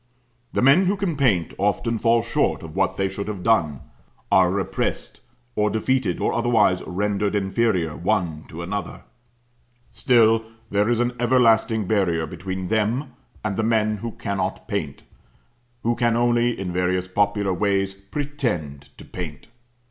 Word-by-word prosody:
The - - 0
men 140 +9 +6
who 200 +2 +1
can 190 -5 -1
paint 110 - +1
often 105 +3 0
fall 115 0 +3
short 120 -4 0
of 80 -1 -9
what 95 -1 0
they 95 - +1
should 100 +1 -5
have 100 -4 -5
done; 80 - +2 0.5
are 95 -2 +5
repressed, 95 +1 -2 0.4
or 105 0 +2
defeated, 110 -2 0
or - - 0
otherwise 115 -6 +2
rendered 100 +2 -1
inferior 95 -5 0
one 85 -5 -1
to 85 +2 -7
another: 95 0 -5 0.9
still 115 -1 +4 0.3
there 100 +2 +2
is 120 -1 +2
an 120 0 +1
everlasting 115 -3 +3
barrier 90 -6 +1
between 95 +1 -5
them 115 +5 0 0.3
and 100 -2 -1
the 110 - 0
men 110 -1 +1
who 115 +2 -6
cannot 95 -2 -3
paint - - -4 0.8
who 120 +1 +1
can 120 -1 +1
only 120 -1 +2
in 90 -2 -4
various 90 0 0
popular 100 0 +1
ways 95 0 0
pretend 100 - -4
to - - -12
paint. 80 -7 -7
105 Hz, 150 wpm, -23 LUFS, 95-115 Hz, 0.9 s, men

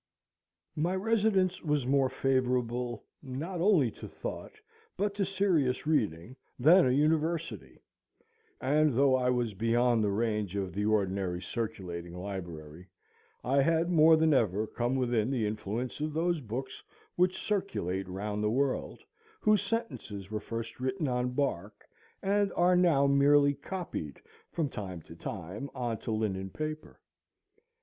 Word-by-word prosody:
My 170 +4 0
residence 200 -3 +1
was 150 -5 0
more 135 0 +3
favorable, 125 -3 0 0.2
not 155 +7 -5
only 175 - +4
to - - -10
thought, - - -7 0.4
but 205 0 0
to 200 -1 0
serious 180 -10 +1
reading, 120 - 0 0.2
than 160 +6 +6
a - - +3
university; 150 - 0 0.8
and 150 0 +2
though 135 -1 +5
I 125 -1 +2
was 120 -3 0
beyond 115 +2 +2
the 105 - +2
range 105 -2 -1
of 95 -2 -3
the 105 +1 -1
ordinary 95 -4 0
circulating 90 -4 -5
library, 90 -3 -7 0.6
I 135 +3 +3
had 165 +4 +2
more 160 -1 +6
than 160 -1 +3
ever 110 -5 +2
come 120 +3 -2
within 120 -3 +1
the 125 -5 0
influence 110 +5 -3
of 155 0 -2
those 165 0 0
books 130 +3 -5 0.3
which 180 +1 +2
circulate 95 - -2
round 105 +3 -3
the 105 - +2
world, 135 - -1 0.4
whose 215 - +3
sentences 110 - -4
were 105 - -2
first 115 +2 -6
written 140 +5 -1
on 125 0 0
bark, 110 -8 -2 0.4
and 200 0 +2
are 180 +1 +4
now 170 -6 +4
merely 140 +1 +5
copied 155 - -6 0.3
from 165 -4 -1
time 95 - -6
to 80 - -12
time 95 +9 -6
on 120 -3 -2
to - - -5
linen 100 -3 -1
paper. 155 +5 -6
125 Hz, 140 wpm, -30 LUFS, 105-155 Hz, 0.8 s, than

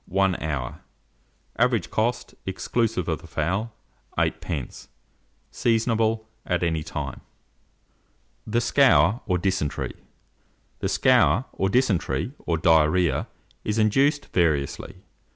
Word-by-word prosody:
1 95 -1 +1
hour. 70 -6 -3 0.8
Average - - +2
cost, 120 +3 -1
exclusive 105 0 -1
of 80 -3 -2
the - - -12
fowl, 95 +9 -2 0.5
8d. 75 -8 -2 0.6
Seasonable 115 -1 +1 0.2
at 90 -1 -1
any 80 -2 0
time. - - -5 1.3
THE 115 +2 +1
SCOUR 125 -4 +4
OR 90 -3 +2
DYSENTERY. 90 -5 -1 0.9
The - - -1
scour, 115 +9 +4
or 95 - 0
dysentery, 100 - +1 0.2
or 85 - +1
diarrhoea, 80 -1 +3 0.4
is 105 +1 -1
induced 135 +7 +2
variously. 80 0 0
95 Hz, 100 wpm, -25 LUFS, 80-115 Hz, 1.3 s, SCOUR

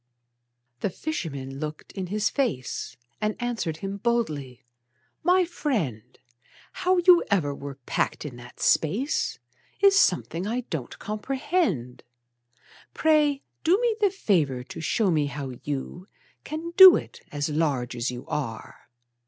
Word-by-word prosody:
The - - -1
fisherman 140 - -5
looked 150 0 -6
in 190 -2 -5
his 210 +3 0
face, 130 - -2 0.2
And 215 0 0
answered 235 -10 -2
him 195 +1 -4
boldly: 155 - -2 0.6
"My 360 +2 +4
friend, 165 - -3 0.5
How 370 0 +1
you 355 0 +6
ever 160 -8 +1
were 140 0 -7
packed - - -1
in 140 -5 -6
that 120 0 -13
space 215 - +1 0.4
Is 395 0 +6
something 180 - +1
I 240 +3 -1
don't 140 -8 -4
comprehend. 215 - -2 0.9
Pray 300 -3 +3 0.2
do 350 +4 +4
me 475 -2 +1
the 405 - +5
favor 160 - 0
to 130 - -8
show 200 +4 +1
me 150 -3 +2
how 140 -2 -5
you 150 +6 -5 0.4
Can 320 +2 -5
do 380 -2 +11
it, - - -5
as 145 0 -2
large 145 -6 0
as 120 +1 -1
you 125 -1 -7
are." 130 -7 -5
185 Hz, 135 wpm, -26 LUFS, -, 0.9 s, do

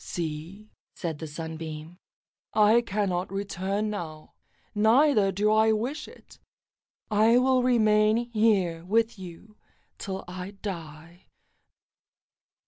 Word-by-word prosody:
"See," 170 +6 -6 0.2
said 165 -5 -4
the 160 - -6
Sunbeam, 160 +2 -7 0.6
"I 215 +2 +5
cannot 195 -5 -2
return 195 +1 -2
now, 160 -6 -7 0.4
neither 220 0 +4
do 205 +3 +1
I 220 0 +4
wish 250 +8 -3
it. - - -16 0.7
I 220 +3 +5
will 255 0 +3
remain 215 -3 +3
here 200 -7 +2
with 225 +3 0
you 190 +4 -11 0.4
till 190 -1 -5
I 185 +2 -7
die." 170 -2 -8
200 Hz, 105 wpm, -27 LUFS, 170-215 Hz, 0.7 s, I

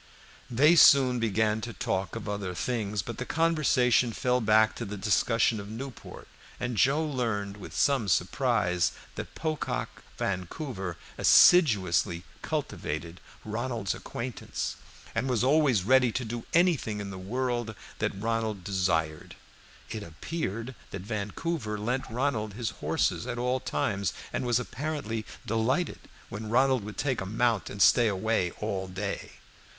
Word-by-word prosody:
They 150 +8 +5
soon 130 -5 +7
began 110 0 +1
to 115 +1 -5
talk 95 -2 -2
of - - -6
other 100 -3 -3
things, 105 -2 -2
but 120 - -7
the - - -1
conversation 130 -7 +2
fell 125 +2 +1
back 110 0 +4
to - - -4
the 105 -1 -5
discussion 110 +3 +2
of 100 0 -8
Newport, 125 +4 -8 0.3
and 125 -1 -2
Joe 140 +7 +3
learned 110 -8 -2
with 100 - -10
some 135 -7 +2
surprise 95 -2 +1 0.2
that - - -7
Pocock 155 -2 -3 0.2
Vancouver 95 - -3 0.2
assiduously 95 - +5 0.2
cultivated 85 +4 -4 0.2
Ronald's 115 -2 -2
acquaintance, 120 0 -5 0.4
and 130 - -1
was 120 -2 +1
always 135 -7 +3
ready 125 +2 +4
to 125 - -2
do 115 +1 -5
anything 165 - +2
in 100 -1 -5
the 95 - -7
world 120 +2 -2 0.2
that 95 - -1
Ronald 110 -3 -1
desired. 80 -6 -1 0.6
It 110 -1 -4
appeared 115 - -4 0.2
that 95 -1 -6
Vancouver 105 - -3
lent 125 +6 -2
Ronald 115 -4 -1
his 115 -1 -2
horses - - -1
at 125 -1 -3
all 125 +2 0
times, 100 -5 -1 0.2
and 125 - -1
was 120 0 +3
apparently 125 -4 -4 0.2
delighted 115 +9 0 0.3
when 110 0 -6
Ronald 130 0 +3
would 105 -2 -8
take 135 -6 0
a - - -3
mount 110 -2 +1
and 100 - +2
stay 120 -2 +6
away 100 -2 +1
all 95 -3 -3
day. 95 +2 -5
115 Hz, 140 wpm, -28 LUFS, 100-125 Hz, 0.6 s, soon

